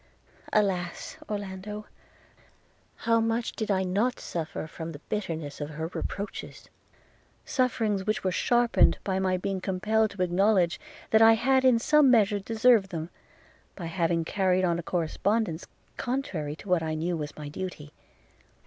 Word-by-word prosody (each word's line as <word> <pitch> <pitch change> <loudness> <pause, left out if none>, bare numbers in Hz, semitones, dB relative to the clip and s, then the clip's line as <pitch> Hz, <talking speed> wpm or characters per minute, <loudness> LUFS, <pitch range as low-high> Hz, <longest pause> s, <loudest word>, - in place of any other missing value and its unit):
– - - -21
Alas! 180 -4 -3
Orlando, 205 +1 -5 1.2
how 230 0 +4
much 225 +1 0
did 220 - -4
I 190 -2 +2
not 205 +7 0
suffer 160 -2 -4
from 160 +1 -7
the 145 - -9
bitterness 160 -8 -4
of 145 - -3
her 160 +2 -5
reproaches! 200 +1 -5 0.8
sufferings 220 -6 0
which 215 - 0
were 185 - +1
sharpened 240 +5 +3
by 190 -1 -1
my 185 -1 +1
being 190 +1 -3
compelled 215 +4 +1
to 195 -2 -2
acknowledge, 180 0 +2 0.3
that 220 - +5
I 225 0 +8
had 260 +4 +3
in 255 -2 +5
some 300 +4 +4
measure 210 -4 +4
deserved 225 0 +3
them, 165 -1 -5 0.6
by 180 - -6
having 165 -1 0
carried 185 0 +2
on 170 -1 +1
a - - -2
correspondence 175 +2 -1 0.3
contrary 185 - -3
to 185 - -13
what 180 -3 +2
I 160 -1 -2
knew 170 +3 -1
was 150 -2 -5
my 150 -1 -6
duty. 150 -2 -7
190 Hz, 150 wpm, -27 LUFS, 170-220 Hz, 1.2 s, I